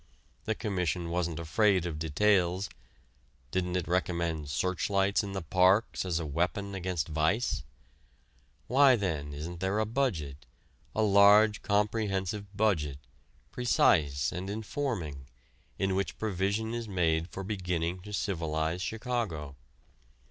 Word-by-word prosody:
The 110 - 0
Commission 90 -5 -2
wasn't 85 -2 -1
afraid 95 +3 +2
of 80 -3 -4
details: 90 +3 +2 0.8
didn't 90 -1 -1
it 90 -3 -1
recommend 85 -4 -1
searchlights 95 +5 +1
in 100 -1 -5
the 95 -2 -3
parks 95 +6 +3
as 85 -2 0
a 85 - -3
weapon 90 +7 -1
against 90 -5 -2
vice? 80 +6 +1 1.0
Why 135 +1 +6
then 80 -9 -2
isn't 80 +4 -6
there 95 +3 0
a 110 - +2
budget, 85 - -2 0.5
a 110 - +2
large, 105 +1 +6
comprehensive 100 -1 -1
budget, 80 -11 +1 0.5
precise 75 - +2
and 90 +2 -5
informing, 100 - -4 0.5
in 95 -1 0
which 95 0 -2
provision 105 +2 -1
is 120 -1 -4
made 85 -3 +1
for 95 - -6
beginning 90 -3 -2
to 105 +3 -10
civilize 80 -4 -1
Chicago? 110 - -3
95 Hz, 120 wpm, -30 LUFS, 80-105 Hz, 1.0 s, Why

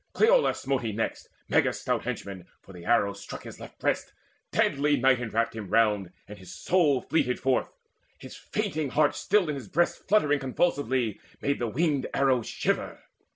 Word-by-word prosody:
Cleolaus - - +3
smote 135 -1 -1
he 115 -2 -3
next, 110 +2 -3 0.2
Meges' - - +2
stout - - -1
henchman; 95 -3 -5 0.2
for 95 - -14
the 85 -1 -11
arrow 105 -3 +2
struck 100 0 -9
His - - -10
left - - -11
breast: - - -1 0.4
deadly 145 +1 +2
night 130 0 +3
enwrapped 115 0 -1
him 105 -4 -6
round, 105 -5 +2 0.2
And 105 - -10
his 90 -2 -12
soul 145 - +2
fleeted 125 -6 0
forth: 130 -1 0 0.5
his - - -11
fainting 150 -2 -3
heart 150 +2 +2
Still 205 -3 +2
in 150 - -1
his 135 -6 -7
breast 170 +2 0
fluttering 150 -9 +3
convulsively 130 - 0 0.2
Made 140 0 -1
the 120 - -1
winged 145 +2 0
arrow 135 -3 +3
shiver. - - -2
130 Hz, 170 wpm, -27 LUFS, 110-145 Hz, 0.5 s, Cleolaus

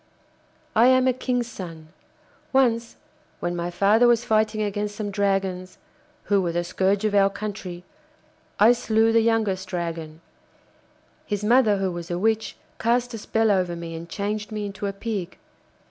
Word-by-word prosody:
'I 230 +3 +6
am 255 0 +4
a 255 - +3
King's 250 -1 -1
son. 165 -8 -9 0.6
Once 235 -3 +2 0.4
when 175 - -2
my 170 0 -2
father 205 +7 +4
was 240 0 +3
fighting 215 -1 +1
against 205 0 -3
some 205 -1 -4
dragons, 195 -2 -1 0.5
who 200 -1 +2
were 175 -2 -1
the 175 +1 -1
scourge 195 +4 0
of 215 - 0
our 195 -1 +5
country, 195 -4 -6 0.8
I 215 +3 +7
slew 225 -2 +2
the 230 0 +4
youngest 215 -5 0
dragon. 165 -3 -5 1.1
His 205 -1 -2
mother, 220 -2 +4
who 190 -1 -1
was 175 -1 -7
a 175 - -2
witch, 220 +3 0 0.2
cast 240 +1 +1
a 225 - -5
spell 220 +1 +1
over 180 -3 +1
me 170 -1 -7
and 165 +1 -8
changed 210 +3 -3
me 210 -1 -3
into 200 0 -5
a 195 - -3
Pig. 195 -3 -5
205 Hz, 160 wpm, -24 LUFS, 185-225 Hz, 1.1 s, I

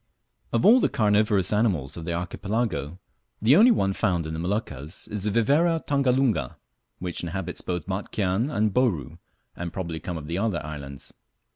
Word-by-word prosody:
Of 115 - +1
all 240 +4 +8
the - - +2
carnivorous 105 -2 +2
animals 95 - +1
of 85 - -7
the 85 - -2
Archipelago 90 - -2 0.4
the 115 +7 +5
only 225 +7 +7
one 95 - +2
found 90 -6 0
in 80 - -4
the 80 - -4
Moluccas 85 -4 -4
is 105 -1 -4
the - - +2
Viverra 150 +10 +2
tangalunga, 130 - +1 0.4
which 90 -1 -4
inhabits 85 +1 -4
both 90 -3 -3
Batchian 100 +4 -1
and 110 -7 0
Bouru, 100 - 0 0.4
and 85 -1 -5
probably 85 -3 -4
come 90 0 -5
of 75 - -7
the 85 +4 -3
other 100 -5 0
islands. 70 -3 -7
95 Hz, 165 wpm, -25 LUFS, 85-115 Hz, 0.4 s, all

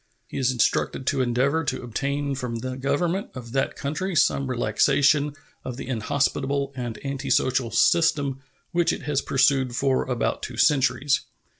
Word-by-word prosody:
He - - -6
is 130 -1 +2
instructed 125 +2 0
to 140 -1 +1
endeavor 130 +6 +1
to 140 - -3
obtain 140 +4 -2
from 125 -3 -4
the 130 +2 -4
Government 155 +8 -1
of 120 -2 -8
that 135 +1 0
country 175 +6 -3
some 140 -3 +2
relaxation 140 +5 +2 0.3
of 125 -1 -6
the - - -7
inhospitable 140 +3 -1
and 120 -3 -4
antisocial 130 -2 0
system 140 -3 +2 0.3
which 170 0 +2
it - - -5
has 140 0 0
pursued 135 -2 +2
for 135 0 +1
about 125 -2 -1
two - - -6
centuries. 140 -1 +3
135 Hz, 150 wpm, -24 LUFS, 125-145 Hz, 0.3 s, centuries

